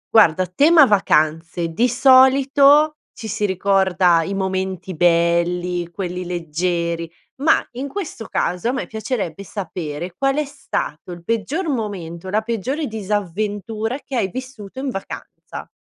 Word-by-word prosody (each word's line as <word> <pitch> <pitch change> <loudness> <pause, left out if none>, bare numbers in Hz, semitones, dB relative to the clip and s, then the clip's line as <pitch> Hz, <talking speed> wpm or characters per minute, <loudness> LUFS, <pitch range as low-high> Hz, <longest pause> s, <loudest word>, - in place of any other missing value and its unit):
Guarda, 185 -4 +6
a - - -3
tema 305 - +6
vacanze 170 -5 +1
di 230 +10 +1
solito 275 +4 +5 0.2
ci 220 - -8
si 210 0 -1
ricorda 190 -2 +3
i 195 +4 -3
momenti 190 -1 -3
belli, 175 +1 +1
quelli 180 0 -5
leggeri 170 -1 -2 0.3
ma 295 +4 +2
in 255 +3 -5
questo 290 - -6
caso 180 +6 -1
a - - 0
me 265 - -3
piacerebbe 215 -5 -4
sapere 175 -3 -6
qual 270 +3 +1
è 300 0 0
stato 270 - -5
il 175 -1 -9
peggior 230 - -2
momento 190 - -4
o - - -4
la 210 +3 +1
peggiore 235 - -2
disavventura 210 +2 -3
che 275 - -5
hai 210 -6 0
vissuto 255 -1 -9
in 265 0 -2
vacanza. 195 -4 -8
200 Hz, 140 wpm, -20 LUFS, 175-255 Hz, 0.3 s, Guarda